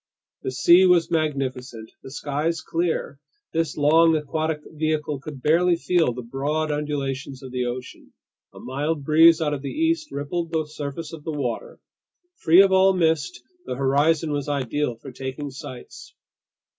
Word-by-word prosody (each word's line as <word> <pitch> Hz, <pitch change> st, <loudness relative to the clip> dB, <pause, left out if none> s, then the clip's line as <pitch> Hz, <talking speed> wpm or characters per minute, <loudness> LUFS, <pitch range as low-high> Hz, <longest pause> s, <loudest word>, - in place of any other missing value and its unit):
The -, -, -3 dB
sea 175 Hz, +8 st, +6 dB
was 175 Hz, -2 st, +3 dB
magnificent, 135 Hz, -7 st, -2 dB
the -, -, -10 dB
skies 150 Hz, +4 st, -2 dB
clear. 165 Hz, -4 st, -2 dB, 0.3 s
This 165 Hz, -2 st, -1 dB
long 160 Hz, +2 st, +5 dB
aquatic 155 Hz, +1 st, -2 dB
vehicle 155 Hz, -2 st, -2 dB
could 135 Hz, -2 st, -9 dB
barely 170 Hz, +3 st, +3 dB
feel 170 Hz, -4 st, +1 dB
the 125 Hz, +1 st, -7 dB
broad 145 Hz, +6 st, -2 dB
undulations 140 Hz, -2 st, -3 dB
of 130 Hz, -, -9 dB
the 125 Hz, -1 st, -2 dB
ocean. 125 Hz, +1 st, -7 dB, 0.4 s
A -, -, -13 dB
mild 145 Hz, +4 st, -3 dB
breeze 160 Hz, +2 st, +6 dB
out 150 Hz, -1 st, 0 dB
of 140 Hz, -, -4 dB
the 140 Hz, -, -5 dB
east 325 Hz, 0 st, -1 dB
rippled 165 Hz, +4 st, -3 dB
the 160 Hz, -2 st, 0 dB
surface 150 Hz, +1 st, -7 dB
of 155 Hz, -2 st, -9 dB
the 160 Hz, -, -4 dB
water. 130 Hz, -6 st, -4 dB, 0.6 s
Free 175 Hz, +3 st, +6 dB
of 195 Hz, -, +2 dB
all 190 Hz, 0 st, +5 dB
mist, 160 Hz, -8 st, 0 dB, 0.2 s
the 130 Hz, -, -3 dB
horizon 145 Hz, +4 st, +2 dB
was 145 Hz, 0 st, -2 dB
ideal 140 Hz, -1 st, -1 dB
for 130 Hz, +4 st, -11 dB
taking 135 Hz, +3 st, -6 dB
sights. 130 Hz, -2 st, -10 dB
150 Hz, 155 wpm, -23 LUFS, 135-165 Hz, 0.6 s, sea